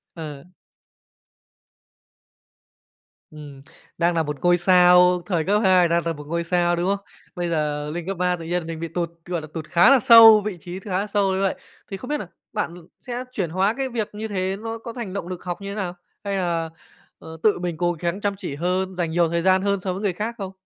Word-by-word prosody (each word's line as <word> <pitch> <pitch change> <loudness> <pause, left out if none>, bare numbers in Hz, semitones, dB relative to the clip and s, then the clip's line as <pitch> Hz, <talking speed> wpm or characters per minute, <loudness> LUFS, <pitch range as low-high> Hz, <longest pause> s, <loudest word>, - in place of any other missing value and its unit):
Ờ. 150 -4 -8 2.9
Ừm, 145 -3 -11 0.4
đang 170 +1 +2
nà 165 -1 +1
một 150 -1 -4
ngôi 175 0 +4
sao, 180 0 +5
thời 175 -5 0
cấp 205 +2 +2
2 185 -2 +5
đang 170 0 0
là 165 - 0
một 145 -1 -11
ngôi 170 +1 -2
sao, 175 0 +1
đúng 175 +2 -1
không? 200 - -12 0.3
Bây 175 -1 -2
giờ 150 -2 -1
lên 175 +1 -5
cấp 195 -2 -4
3 180 0 +1
tự 170 - -9
nhiên 175 -1 -2
mình 165 -1 -5
bị 165 - -4
tụt, 170 +1 -3 0.2
gọi 175 -2 -3
là, 155 - -9
tụt 160 -2 -5
khá 175 +6 +5
là 275 -2 +6
sâu, 225 -2 +9
vị 205 -4 -3
trí 175 +4 -7
khá 190 -1 -2
là 205 - -2
sâu 200 -2 +1
như 190 - -1
vậy. 195 - +1 0.4
Thì 195 - -4
không 250 - -9
biết 300 - 0
nà 195 - -7 0.3
bạn 170 - -2 0.3
sẽ 245 0 -5
chuyển 185 -8 -2
hóa 190 +5 +1
cái 270 -1 -2
việc 230 -4 -3
như 220 +1 -4
thế 190 -1 -2
nó 225 0 -5
có 230 +1 -8
thành 220 -6 -6
động 200 -3 -4
lực 180 -1 -7
học 180 +1 -5
như 200 - -6
thế - - -6
nào, 180 -4 -4 0.3
hay 200 -1 -2
là, 170 -3 -1 0.5
ờ, 160 0 -10
tự 210 -4 +3
mình 175 -3 -3
cố 175 0 +1
gắng 170 +4 -3
chăm 200 -1 -1
chỉ 175 -8 -6
hơn, 185 +4 -1
dành 170 -2 -2
nhiều 170 0 +2
thời 170 0 0
gian 185 +1 +3
hơn 200 0 0
so 185 0 -3
với 195 - -6
người 200 -3 0
khác 215 +6 -4
không? 195 -2 -5
180 Hz, 235 wpm, -23 LUFS, 170-200 Hz, 2.9 s, sâu